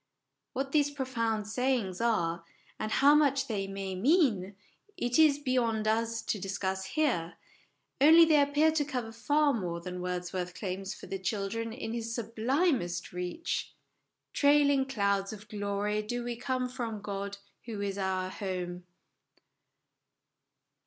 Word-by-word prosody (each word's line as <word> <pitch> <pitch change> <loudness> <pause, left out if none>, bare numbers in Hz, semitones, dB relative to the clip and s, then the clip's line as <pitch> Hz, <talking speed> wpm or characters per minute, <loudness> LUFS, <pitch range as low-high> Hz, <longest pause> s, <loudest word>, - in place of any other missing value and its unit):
What 270 0 -2
these 290 -1 +3
profound 230 -6 -2
sayings 230 -5 0
are, 170 -8 +1 0.4
and 215 - -3
how 280 +5 +6
much 280 -3 +3
they 205 -6 -2
may 195 -1 -4
mean, 210 - +2 0.4
it 245 -3 +1
is 305 -3 +6
beyond 235 -6 0
us 230 +1 0
to 210 - -2
discuss 190 0 -2
here; 190 - 0 0.7
only 325 +3 +9
they 305 -2 +5
appear 290 +3 +3
to 310 -2 +1
cover 250 -6 -4
far 290 +5 +2
more 175 -7 -2
than 180 +1 -6
Wordsworth 180 0 -3
claims 190 -1 -4
for - - -11
the 195 - -4
children 205 +4 -2
in 225 -1 -5
his 230 -1 -3
sublimest 230 - 0
reach 180 - -3 0.3
" - - -55
Trailing 285 -2 +4
clouds 200 -5 0
of 210 0 -11
glory 205 0 -1
do 240 +3 -3
we 240 0 -3
come 255 +1 -1
From 240 -4 -4
God, 200 0 -4 0.3
who 225 -3 -5
is 200 -1 -2
our 185 -1 -1
home." 180 -3 -4
225 Hz, 140 wpm, -30 LUFS, 195-270 Hz, 0.7 s, only